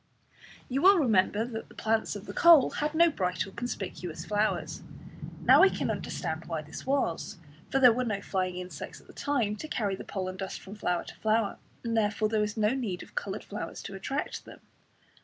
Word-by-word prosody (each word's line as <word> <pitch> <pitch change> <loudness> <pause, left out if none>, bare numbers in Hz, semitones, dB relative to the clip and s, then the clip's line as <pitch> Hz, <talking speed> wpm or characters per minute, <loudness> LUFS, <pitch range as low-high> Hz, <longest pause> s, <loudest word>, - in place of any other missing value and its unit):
You 265 +2 -1
will 390 +3 +7
remember 220 - +3
that 225 -2 -6
the - - -16
plants 220 -1 0
of 205 0 -7
the - - -7
coal 335 -6 +7
had 300 +1 -2
no 335 +1 +6
bright 180 - -1
or 195 - -10
conspicuous 190 -7 -5
flowers. 210 +1 -1 0.6
Now - - +7
we 385 - +8
can - - -1
understand 160 -1 -4
why 160 -2 -3
this 150 - -9
was, 265 -15 0 0.3
for - - +1
there 250 -3 +8
were 255 +2 0
no 210 -5 -1
flying 185 -2 -2
insects 180 0 -7
at - - -20
that - - -16
time 245 -8 0
to 310 - -6
carry 205 -9 -1
the - - -8
pollen 185 -1 -4
dust 190 0 -5
from 195 - -10
flower 180 -5 -1
to - - -11
flower, 220 -1 +1 0.2
and 230 -1 -1
therefore 215 0 +1
there 215 -1 +1
was 210 +1 -2
no 210 -1 +3
need 230 -8 -2
of - - -17
coloured 200 +1 -4
flowers 210 - -6
to - - -7
attract 270 +9 -4
them. - - -13
210 Hz, 205 wpm, -29 LUFS, 190-250 Hz, 0.6 s, we